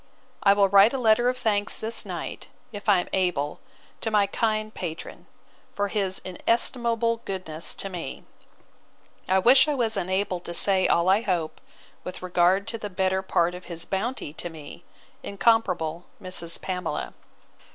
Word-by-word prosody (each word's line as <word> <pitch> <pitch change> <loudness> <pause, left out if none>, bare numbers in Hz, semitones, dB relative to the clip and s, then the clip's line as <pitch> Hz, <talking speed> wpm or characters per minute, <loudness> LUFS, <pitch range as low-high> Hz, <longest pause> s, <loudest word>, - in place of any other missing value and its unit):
I 200 - +6
will 200 -1 +4
write 200 +4 +6
a - - 0
letter 240 0 +3
of 255 - -2
thanks 205 -4 0
this 225 +1 -1
night, - - -6 0.2
if 205 0 -5
I 195 -3 +5
am - - -9
able, 175 -6 0 0.4
to 225 - -1
my 210 -2 +3
kind 215 +1 -1
patron, 165 -3 -7 0.5
for 205 0 -1
his 195 -3 0
inestimable 230 +4 0
goodness 185 -6 -5
to - - -5
me. 175 -8 -7 1.0
I 190 - +3
wish 245 +10 +6
I 300 - 0
was 225 -4 +1
enabled 185 -1 -1
to 170 - -4
say 190 0 +4
all 170 +1 +2
I 195 +3 +4
hope, 170 -7 -2 0.4
with 180 - -8
regard 185 +2 +2
to 230 - -2
the 210 - -5
better 190 0 0
part 175 -2 +1
of 180 0 -9
his 170 -1 -7
bounty 200 - -3
to 175 - -6
me, 155 -3 -11 0.4
incomparable 180 -6 0
Mrs. 175 -3 0
Pamela. 180 -1 -4
195 Hz, 160 wpm, -25 LUFS, 180-220 Hz, 1.0 s, I